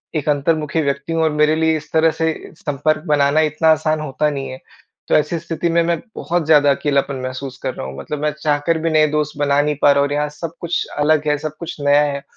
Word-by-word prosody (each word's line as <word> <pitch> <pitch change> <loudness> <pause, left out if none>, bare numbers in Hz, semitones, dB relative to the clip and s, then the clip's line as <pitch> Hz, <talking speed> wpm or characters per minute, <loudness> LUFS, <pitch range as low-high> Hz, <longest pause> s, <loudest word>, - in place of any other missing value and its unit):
एक 155 -1 -1
अंतर्मुखी 150 +2 0
व्यक्ति 140 +2 -2
हूँ 165 0 +1
और 160 - +2
मेरे 150 +1 +2
लिए 160 0 +2
इस 155 - -11
तरह 160 0 +4
से 160 0 +2 0.2
संपर्क 155 +1 -1
बनाना 145 +1 +3
इतना 160 +2 +2
आसान 155 0 +1
होता 150 +1 -1
नहीं 140 -2 -4
है। 130 - -8 0.5
तो - - +2
ऐसी 150 +3 +1
स्थिति 170 +1 -3
में 170 0 +3
मैं 170 0 0 0.2
बहुत 175 -1 -1
ज़्यादा 145 -2 +5
अकेलापन 140 -1 0
महसूस 130 0 -6
कर 130 - -2
रहा - - -6
हूँ, 65 +1 -8
मतलब 145 - -5
मैं 150 0 +1
चाहकर 150 +2 +1
भी 165 +1 0
नए 155 -1 +4
दोस्त 150 -1 -2
बना 145 0 +3
नहीं 150 0 -1
पा 145 - +6
रहा 140 - +3
हूँ 140 - +2
और 145 - -4
यहाँ 150 0 0
सब 160 +2 -7
कुछ 170 0 -1
अलग 150 0 +2
है, 150 0 +2
सब 155 +1 -6
कुछ 170 - -6
नया 145 +1 +4
है 140 -1 -3
150 Hz, 245 wpm, -19 LUFS, 145-160 Hz, 0.5 s, पा